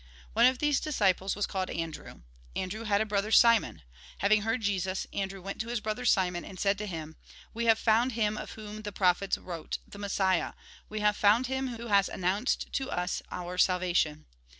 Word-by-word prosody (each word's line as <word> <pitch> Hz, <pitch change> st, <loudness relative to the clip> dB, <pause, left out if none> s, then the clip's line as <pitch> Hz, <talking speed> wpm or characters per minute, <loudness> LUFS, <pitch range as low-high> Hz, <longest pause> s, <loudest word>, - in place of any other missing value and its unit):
One 235 Hz, +3 st, +6 dB
of 255 Hz, 0 st, +2 dB
these 295 Hz, 0 st, +2 dB
disciples 195 Hz, -, +1 dB
was 205 Hz, -, 0 dB
called 190 Hz, -1 st, -3 dB
Andrew. 165 Hz, -, -6 dB, 0.3 s
Andrew 210 Hz, +5 st, -3 dB
had 205 Hz, -1 st, +2 dB
a -, -, +1 dB
brother 205 Hz, 0 st, -1 dB
Simon. 230 Hz, -, +4 dB, 0.3 s
Having 210 Hz, +1 st, +3 dB
heard 225 Hz, +3 st, -1 dB
Jesus, 190 Hz, -2 st, -1 dB
Andrew 195 Hz, -1 st, -4 dB
went 195 Hz, +2 st, -4 dB
to 225 Hz, -, -5 dB
his 240 Hz, 0 st, -1 dB
brother 215 Hz, +3 st, -3 dB
Simon, 180 Hz, -6 st, +2 dB
and 185 Hz, -, -10 dB
said 200 Hz, 0 st, +1 dB
to 210 Hz, -, -4 dB
him: 160 Hz, -3 st, -6 dB, 0.2 s
" -, -, -21 dB
We 235 Hz, +1 st, -2 dB
have 225 Hz, -1 st, +5 dB
found 230 Hz, +3 st, +2 dB
him 215 Hz, -2 st, 0 dB
of -, -, -6 dB
whom 215 Hz, -1 st, -8 dB
the 205 Hz, -1 st, -5 dB
prophets 190 Hz, 0 st, +2 dB
wrote, 170 Hz, -3 st, -5 dB
the 200 Hz, -, -11 dB
Messiah; 195 Hz, -2 st, 0 dB, 0.4 s
we 215 Hz, 0 st, -4 dB
have 210 Hz, 0 st, +3 dB
found 215 Hz, +5 st, +4 dB
him 265 Hz, -2 st, -2 dB
who 235 Hz, -, -7 dB
has 200 Hz, -3 st, +3 dB
announced 190 Hz, +7 st, -1 dB
to 270 Hz, -1 st, -2 dB
us 180 Hz, +1 st, -2 dB
our 180 Hz, 0 st, -5 dB
salvation." 180 Hz, -5 st, +2 dB
205 Hz, 195 wpm, -29 LUFS, 185-225 Hz, 0.4 s, One